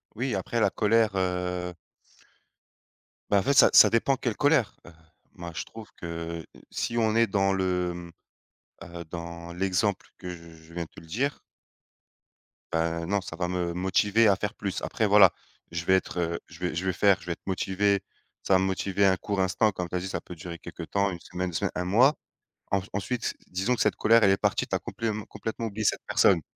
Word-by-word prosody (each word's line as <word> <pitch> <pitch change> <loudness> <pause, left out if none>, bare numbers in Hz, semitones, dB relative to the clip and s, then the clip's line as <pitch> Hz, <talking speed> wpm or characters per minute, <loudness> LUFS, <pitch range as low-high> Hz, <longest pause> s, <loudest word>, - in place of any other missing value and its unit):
Oui, 125 +1 -2
après 105 +5 -2
la - - +4
colère, 110 0 +3
heu 90 -1 -1 1.6
bah, 100 - +5
en - - -1
fait, 140 - +2
ça - - +7
ça 105 - +9
dépend 115 +4 +2
quelle 120 -6 -2
colère, 145 -6 +3
heu, - - -11 0.4
moi, 85 -1 -7
je - - -2
trouve 110 -1 -11
que 85 -1 -5 0.3
si 115 - -2
on 110 -1 +2
est 115 0 +4
dans 95 0 +2
le, 90 -2 0
mmh, 85 -1 -9 0.7
heu, 85 0 -8
dans 85 0 -7
l'exemple 95 +2 0
que 90 -1 -7
je 85 -1 -10
je 80 +1 -16
viens 85 -1 -2
de - - -14
le 80 - -15
dire 130 - -2 1.3
bah 85 0 -1
non, 100 +2 +1
ça 85 - -8
va 90 +1 -2
me 90 -1 -2
motiver 100 +4 +3
à 100 - +5
faire 100 +1 -3
plus. 100 -2 -4
Après, 110 -3 0
voilà, 100 -3 +7 0.4
je 85 0 -4
vais 95 - +5
être, 95 - -1
heu, 85 -1 -1
je - - -14
vais - - -2
je 85 +3 -2
vais 95 - +1
faire, 100 0 +4
je - - -14
vais 90 - -3
être - - -7
motivé, 100 +1 +1 0.4
ça - - +2
va 95 - +6
me 95 - +1
motiver 95 +1 +1
un 95 -1 +3
court 100 0 -2
instant 100 +4 +2
comme 90 -2 -5
tu 90 - -5
as - - +1
dit, 95 - -5
ça - - -4
peut 90 - -10
durer 85 +1 -8
quelque 85 -1 -8
temps, 100 +4 0
1 90 - -6
semaine, 90 +1 -4
2 80 - -8
semaines, - - 0
1 90 - -2
mois. 120 +10 +5 0.6
Ens 100 -1 +1
ensuite, 110 +4 -2
disons 95 +7 0
que - - -3
cette - - +2
colère, 115 +1 +4
elle 95 - +6
est 95 - +3
partie, - - 0
tu - - -1
as - - 0
complèment 110 -2 -4
complètement 115 0 -4
oublié 110 +1 -4
cette - - +2
personne. 90 -4 +4
95 Hz, 215 wpm, -27 LUFS, 85-105 Hz, 1.6 s, ça